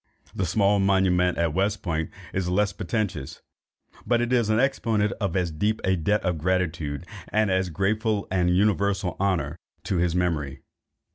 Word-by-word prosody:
The 95 - -1
small 100 +3 +3
monument 95 -2 +2
at 85 -2 +1
West 100 +3 0
Point 80 -4 -2 0.2
has 95 -2 -1
less 100 +2 +1
pretension, 105 - -2 0.8
but 120 +1 +2
it 120 +1 0
is 120 -3 +3
the 110 +1 +2
exponent 115 -6 +1
of 100 - -1
as 90 -3 0
deep 105 +8 0
a 95 0 +2
debt 105 +5 0
of 90 -4 -1
gratitude, 85 -4 -1 0.2
and 110 -2 +1
of 95 - +3
as 95 -1 -2
grateful 105 +4 0
and 90 -2 +2
universal 100 0 +1
honour 95 -3 0 0.3
to 95 - -1
his 85 0 +1
memory. 80 -6 -1
95 Hz, 165 wpm, -25 LUFS, 90-105 Hz, 0.8 s, small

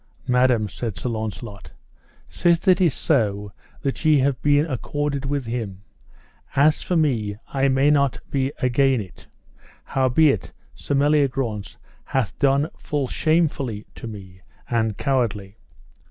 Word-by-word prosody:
Madam, 125 -3 +3
said 105 +1 -5
Sir 125 - -3
Launcelot, 110 -2 -6 0.5
sith 170 +2 +1
it 185 0 +5
is 165 -7 +3
so 105 -8 0 0.3
that 135 +1 -2
ye 150 -4 +4
been 145 +1 +3
accorded 145 0 -3
with 140 -2 -2
him, 110 -5 -5 0.7
as 150 +2 +4
for 180 - -2
me 115 -11 +1
I 135 0 +1
may 135 +2 +3
not 140 -3 +2
be 135 0 0
again 130 0 +2
it, 95 -5 -10 0.6
howbeit 135 - +2 0.2
Sir 145 - -3
Meliagrance 135 -7 +1 0.3
hath 130 -8 -2
done 140 +2 +3
full 145 -4 -2
shamefully 145 -9 0
to - - -8
me, 95 -4 -10 0.3
and 110 -3 0
cowardly. 110 -7 -1
130 Hz, 125 wpm, -23 LUFS, 110-145 Hz, 0.7 s, it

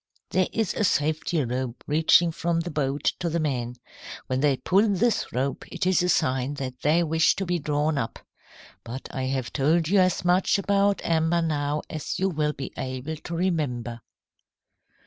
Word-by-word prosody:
"There 185 -1 +2
is 225 -5 -1
a - - -1
safety 155 -2 +1
rope 125 0 -4
reaching 160 +3 +4
from 165 +1 -1
the 175 - -5
boat 140 -1 -2 0.2
to 175 -2 -1
the 170 +1 -1
men. 125 -6 -2 0.5
When 130 0 -1
they 140 -1 +2
pull 195 +11 +3
this 215 +3 +1
rope 135 +3 -2
it - - -2
is 185 -2 +3
a 180 - +1
sign 130 -2 +1
that 130 -3 -6
they 160 +4 +3
wish 160 0 +3
to 195 - -3
be 175 -1 0
drawn 150 0 0
up. 115 - -4 0.7
But 125 +3 -7
I 130 -2 -2
have 130 -2 -2
told 155 +3 +2
you 200 +1 +4
as 185 -1 +2
much 180 +3 +3
about 200 0 +1
amber 165 +1 +2
now 150 -2 -1
as 155 - -4
you 190 +1 +1
will 150 -3 0
be 135 -2 -7
able 130 +4 -4
to 165 +3 -6
remember." 135 -10 -2
155 Hz, 180 wpm, -25 LUFS, 135-175 Hz, 0.7 s, reaching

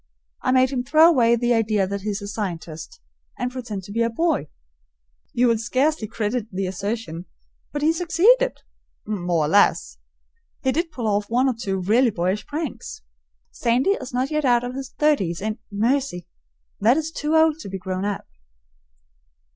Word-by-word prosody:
I - - +1
made 255 0 +4
him 250 -2 -1
throw 310 +5 +6
away 240 -8 +4
the 240 +1 +1
idea 215 -3 +2
that 200 +1 -4
he 210 - -3
is 205 0 -3
a - - -5
scientist, 185 - -6 0.4
and 250 0 -2
pretend 235 -7 -6
to 200 - -10
be 230 +3 -1
a 230 - +2
boy. 290 - 0 0.8
You 245 - +2
will 230 -2 +2
scarcely 255 +1 0
credit 220 +1 -2
the 190 0 -2
assertion, 190 -2 -4 0.5
but 290 0 -3
he 320 +2 +4
succeeded 405 +10 +3 0.5
more 175 -6 0
or - - -1
less. 200 +6 +2 0.6
He 265 - +2
did 335 +4 -1
pull 250 -7 -5
off 205 0 0
one 250 +3 +2
or 260 - +2
two 200 -4 -3
really 225 +7 +3
boyish 185 +1 -2
pranks. 300 - -5 0.5
Sandy 245 +9 +1
is 260 -10 -3
not 255 +3 -1
yet 305 0 0
out 245 -2 +3
of 245 0 -4
his 265 0 -6
thirties 200 - +1
and, 215 +2 -3
mercy! 225 - 0 0.5
that 230 +7 +4
is 320 0 -2
too 305 0 -1
early 320 -1 +4
to 255 - -8
be 190 - -4
grown 185 0 -4
up. 205 -1 -3
235 Hz, 180 wpm, -23 LUFS, 200-275 Hz, 0.8 s, throw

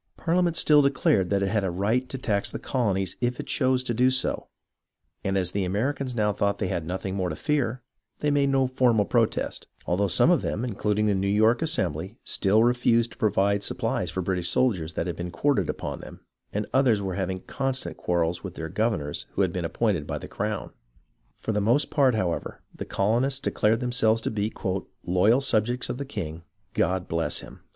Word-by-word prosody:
Parhament 175 0 +1
still 150 -2 +5
declared 135 -9 +2
that 100 -1 +1
it 95 - 0
had 105 0 +1
a 95 - 0
right 110 +8 0
to 135 - -4
tax 105 -5 -1
the - - -4
colonies 95 -8 -1
if 120 0 -1
it - - -4
chose 130 -1 +1
to 120 - -2
do 125 +3 +4
so, 130 0 0 0.8
and 95 0 0
as 90 -2 0
the 100 0 -1
Americans 125 +7 -1
now 105 -2 +1
thought 100 0 0
they 95 - -2
had 80 -2 -3
nothing 95 +2 -3
more 95 -2 -1
to - - -4
fear, 130 -5 -1 0.3
they 150 - 0
made 140 -1 +3
no 135 -1 +3
formal 125 -5 +2
protest, - - 0 0.2
although 95 +4 +1
some 95 - +4
of 175 - +3
them, 115 - -2
including 105 -2 0
the 105 - +3
New 95 0 0
York 110 +5 +3
Assembly, 95 - 0
still 105 +3 +2
refused 120 -1 +2
to - - -15
provide 100 -2 +2
supplies - - -1
for 95 - -2
the - - -6
British 90 -2 0
soldiers 90 -11 +1
that 85 - -2
had 85 -2 -3
been 90 +1 -5
quartered 100 - +1
upon - - -4
them, - - -11 0.3
and 105 +1 -2
others 130 -5 +4
were 95 -2 -3
having 95 0 -2
constant 130 - -2
quarrels 85 0 -1
with 95 -3 -7
their 80 0 -5
governors 100 -8 -1
who 100 - +2
had 90 -3 0
been 90 -2 -2
appointed 85 -2 0
by - - -3
the - - -8
crown. 105 0 -3 0.7
For - - -3
the 105 -1 0
most 120 +8 +2
part, 135 -5 +3
however, 90 -5 -2
the - - -6
colonists 120 +7 +1
declared 115 -4 +1
themselves 115 -3 +2
to - - -1
be 105 0 -1 0.5
"loyal 100 +9 +3
subjects 120 -1 0
of 125 +1 -3
the 140 - -3
king 85 - -5 0.2
— - - -44
God 90 -1 0
bless 85 0 0
him!" - - -12
105 Hz, 205 wpm, -26 LUFS, 95-125 Hz, 0.8 s, still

